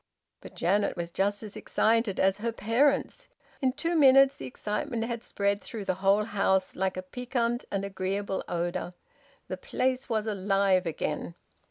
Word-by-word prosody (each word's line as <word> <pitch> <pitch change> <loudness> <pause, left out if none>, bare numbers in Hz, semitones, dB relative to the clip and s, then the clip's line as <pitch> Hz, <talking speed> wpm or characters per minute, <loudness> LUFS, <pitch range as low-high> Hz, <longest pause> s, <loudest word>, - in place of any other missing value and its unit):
But - - -12
Janet 200 +4 +1
was 170 0 -4
just 205 +4 0
as 210 -2 -8
excited 225 -2 +1
as 195 +1 +3
her 230 +2 -1
parents. 240 +6 +1 0.3
In 260 -1 +3
two 330 +6 -2
minutes 275 -2 +6
the 130 - -7
excitement 210 - -3
had 235 0 -4
spread 200 0 -1
through 215 -4 -7
the - - +1
whole 200 +2 +4
house, 195 -3 +1
like 190 0 -1
a 185 - -4
piquant 240 +3 -2
and 195 0 -2
agreeable 195 0 -2
odour. 175 +1 -2 0.5
The - - -4
place 260 - -1
was 220 -2 0
alive 195 -3 +2
again. 160 +1 -3
205 Hz, 160 wpm, -28 LUFS, 190-235 Hz, 0.5 s, minutes